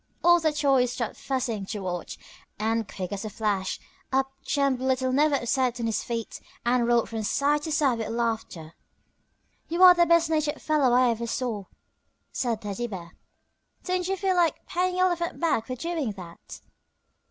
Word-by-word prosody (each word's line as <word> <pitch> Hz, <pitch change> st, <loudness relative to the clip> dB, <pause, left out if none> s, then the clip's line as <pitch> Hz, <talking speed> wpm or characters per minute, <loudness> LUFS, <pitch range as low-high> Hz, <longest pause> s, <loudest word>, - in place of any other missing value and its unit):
All 345 Hz, 0 st, +6 dB
the 315 Hz, -2 st, +1 dB
toys 270 Hz, -4 st, +2 dB
stopped 235 Hz, -3 st, -3 dB
fussing 250 Hz, -6 st, -2 dB
to 210 Hz, -1 st, -4 dB
watch, 180 Hz, -2 st, -4 dB, 0.4 s
and 220 Hz, 0 st, -1 dB
quick 185 Hz, -2 st, -5 dB
as 200 Hz, -1 st, -4 dB
a 215 Hz, -, -4 dB
flash 205 Hz, -3 st, -2 dB, 0.3 s
up 270 Hz, 0 st, +1 dB
jumped 275 Hz, -3 st, 0 dB
Little 260 Hz, 0 st, +1 dB
Never 295 Hz, +2 st, +3 dB
upset 250 Hz, -1 st, 0 dB
on 235 Hz, -, -2 dB
his 225 Hz, -1 st, -1 dB
feet 230 Hz, -2 st, -5 dB, 0.2 s
and 240 Hz, 0 st, +2 dB
rolled 240 Hz, -1 st, +3 dB
from 225 Hz, -1 st, -4 dB
side 285 Hz, +7 st, +1 dB
to 315 Hz, -, -5 dB
side 275 Hz, -6 st, +2 dB
with 225 Hz, -, -3 dB
laughter. 225 Hz, -8 st, -3 dB, 0.9 s
"You 340 Hz, +3 st, +2 dB
are 365 Hz, -1 st, +11 dB
the 345 Hz, -1 st, +3 dB
best 335 Hz, 0 st, +4 dB
natured 305 Hz, -2 st, 0 dB
fellow 300 Hz, -5 st, +2 dB
I 250 Hz, -1 st, +5 dB
ever 235 Hz, +1 st, -3 dB
saw," 225 Hz, -4 st, -3 dB, 0.7 s
said 230 Hz, -4 st, -2 dB
Teddy 210 Hz, +4 st, -3 dB
Bear. 180 Hz, -5 st, -9 dB, 0.7 s
"Don't 365 Hz, -1 st, -1 dB
you 385 Hz, 0 st, -1 dB
feel 380 Hz, -1 st, +1 dB
like 340 Hz, -3 st, +1 dB
paying 365 Hz, 0 st, -1 dB
Elephant 350 Hz, -2 st, 0 dB
back 305 Hz, -10 st, 0 dB
for 255 Hz, -, -3 dB
doing 310 Hz, -5 st, -3 dB
that?" 175 Hz, -3 st, -11 dB
255 Hz, 175 wpm, -26 LUFS, 225-310 Hz, 0.9 s, are